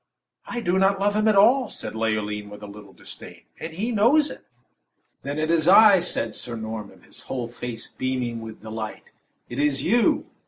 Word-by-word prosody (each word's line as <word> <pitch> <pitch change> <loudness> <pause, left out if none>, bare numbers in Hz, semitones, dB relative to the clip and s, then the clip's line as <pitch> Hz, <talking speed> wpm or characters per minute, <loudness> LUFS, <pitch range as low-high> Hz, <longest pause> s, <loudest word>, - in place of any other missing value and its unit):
"I 240 - -4
do 180 -2 +1
not 195 0 +3
love 205 +1 +1
him 215 +1 +2
at 215 - +4
all," 240 +6 +5
said - - -5
Leoline, 105 -2 -2
with 105 0 -11
a - - -5
little 100 -1 -12
disdain, - - -12 0.2
"and 160 - -6
he 205 +9 -3
knows 245 +8 +3
it." - - -12 0.8
"Then 140 +2 -5
it 155 +1 0
is 165 -1 +2
I!" 200 +1 +8
said 115 -10 -3
Sir 120 - -5
Norman, 110 -2 -7
him - - -22
whole 125 -3 -4
face 120 -1 -7
beaming 125 -3 -3
with 110 -1 -10
delight. 110 0 -7 0.4
"It 120 - -6
is 145 -2 +1
you!" 235 +1 +2
135 Hz, 190 wpm, -24 LUFS, -, 0.8 s, I